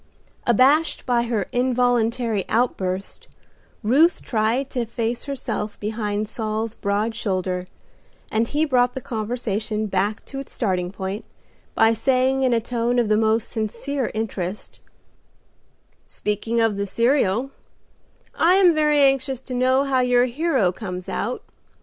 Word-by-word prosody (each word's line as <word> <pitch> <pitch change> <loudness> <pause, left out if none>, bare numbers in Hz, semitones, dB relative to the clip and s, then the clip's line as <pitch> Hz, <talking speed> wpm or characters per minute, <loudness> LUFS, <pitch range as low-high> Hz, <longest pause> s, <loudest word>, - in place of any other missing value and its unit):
Abashed 270 +7 +3
by 240 -2 +1
her 225 -5 -1
involuntary 245 -3 +1
outburst, 195 -5 -1 0.6
Ruth 290 +11 +3
tried 230 +4 0
to 255 - -2
efface 235 0 -3
herself 260 -6 -4
behind 210 0 -2
Saul's 220 0 -3
broad 210 +2 -1
shoulder, 185 -4 -2 0.6
and 225 +1 +1
he 300 +4 +1
brought 250 -4 +2
the - - -2
conversation 220 -2 -3
back 205 +1 -1
to 270 - -7
its 275 - -8
starting 185 -5 -1
point 195 +2 -5 0.5
by 225 0 +5
saying 260 +3 +1
in 260 -1 +2
a 235 - +3
tone 240 +1 -1
of 235 -3 +2
the 215 - +4
most 220 +1 +1
sincere 235 +5 -2
interest, 210 -3 -4 1.3
"Speaking 210 +3 -2
of 225 -3 +2
the 200 0 -2
serial, 240 +1 +1 0.8
I 345 +3 +4
am 370 -3 +6
very 300 -1 +3
anxious 270 -2 +2
to 260 - -7
know 255 +2 +3
how 270 -2 +1
your 250 -1 +3
hero 255 - +1
comes 180 -2 -6
out. 245 +5 -3
230 Hz, 135 wpm, -22 LUFS, 210-255 Hz, 1.3 s, am